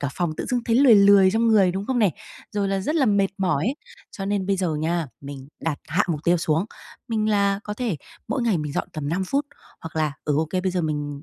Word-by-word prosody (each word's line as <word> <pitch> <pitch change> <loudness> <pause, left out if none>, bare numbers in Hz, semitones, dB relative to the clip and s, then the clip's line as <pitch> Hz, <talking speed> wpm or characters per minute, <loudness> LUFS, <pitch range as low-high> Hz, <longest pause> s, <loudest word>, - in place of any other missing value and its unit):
cả 140 - -1
phòng 175 -3 -1
tự - - -4
dưng 245 -1 0
thấy 230 -1 +2
lười 260 -3 +7
lười 200 -2 +6
trong 225 +3 +1
người, 195 -5 +4
đúng 195 +2 -4
không 260 -2 0
này? 200 -8 +3 0.4
Rồi 200 -1 0
là 195 0 0
rất 300 +11 -2
là 270 -5 +3
mệt 200 -2 +3
mỏi 175 -7 +1
ấy, 270 - -1 0.3
cho 195 -3 -6
nên 200 -1 -1
bây 195 -1 +1
giờ 180 -4 -1
nha, 160 +1 -1
mình 140 -1 -9
đặt 160 -3 -2
hạ 185 +7 +2
mục 155 -4 -1
tiêu 175 +1 +4
xuống. 160 +1 0 0.4
Mình 220 -2 0
là 200 -1 +2
có 210 - -4
thể 225 -8 -2 0.3
mỗi 265 - -1
ngày 220 -7 +1
mình 150 -2 -4
dọn - - -2
tầm 150 -2 -4
5 180 +5 -1
phút, 280 +8 -1 0.3
hoặc 160 0 -9
là, 155 -2 +1
ừ, 150 -1 +1
ô 160 +1 +1
kê, 185 - 0
bây 185 - -1
giờ 180 - 0
mình 145 -2 -3
190 Hz, 260 wpm, -23 LUFS, 160-210 Hz, 0.4 s, lười